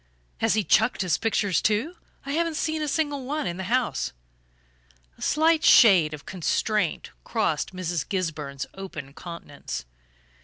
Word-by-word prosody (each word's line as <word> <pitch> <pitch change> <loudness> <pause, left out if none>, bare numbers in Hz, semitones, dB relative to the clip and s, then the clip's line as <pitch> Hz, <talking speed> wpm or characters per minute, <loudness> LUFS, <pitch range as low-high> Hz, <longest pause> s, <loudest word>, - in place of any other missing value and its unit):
"Has - - +2
he 215 - +2
chucked 220 +5 +3
his 180 -4 +1
pictures 205 -5 +1
too? 225 +12 0 0.3
I 280 - -4
haven't 330 +1 0
seen 315 0 -1
a 305 - -1
single 290 -2 -1
one 295 +4 -2
in 175 -1 -3
the 190 - -4
house." 185 - 0 1.0
A - - -21
slight 320 +1 +3
shade 185 -10 +7
of 145 - -15
constraint 185 - -1
crossed - - -1
Mrs. 175 -3 -3
Gisburn's 150 -8 -3
open 155 -8 -8
countenance. 155 - -7
195 Hz, 145 wpm, -25 LUFS, 170-280 Hz, 1.0 s, shade